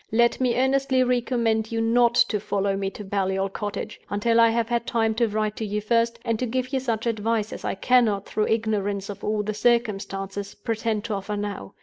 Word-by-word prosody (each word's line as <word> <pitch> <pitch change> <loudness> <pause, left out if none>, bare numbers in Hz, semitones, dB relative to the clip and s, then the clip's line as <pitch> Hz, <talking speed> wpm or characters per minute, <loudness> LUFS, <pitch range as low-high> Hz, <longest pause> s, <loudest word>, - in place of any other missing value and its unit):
Let 235 +3 +3
me 245 -2 +2
earnestly 265 0 +2
recommend 235 -3 0
you 225 - -1
not 235 +1 +3
to 210 -3 +3
follow 200 -1 -1
me 195 0 -2
to 210 - -9
Baliol 195 0 -1
Cottage, 205 -1 -5
until 230 +3 +2
I 230 0 +7
have 230 0 0
had 235 0 -1
time 225 -1 +1
to 230 +1 +2
write 215 0 -1
to - - -3
you 210 0 -2
first, 230 +2 +1
and 230 -2 0
to 255 - -1
give 255 +3 -2
you 265 - +2
such 230 -3 -2
advice 220 -1 -1
as - - -8
I - - -2
cannot, 215 -2 +2
through 215 - -1
ignorance 205 -3 -1
of 200 - -7
all 210 0 0
the 215 +1 -2
circumstances, 200 -4 -1
pretend 220 -1 -2
to 220 - -3
offer 205 +1 -3
now. 205 -1 -5
220 Hz, 210 wpm, -24 LUFS, 205-235 Hz, -, I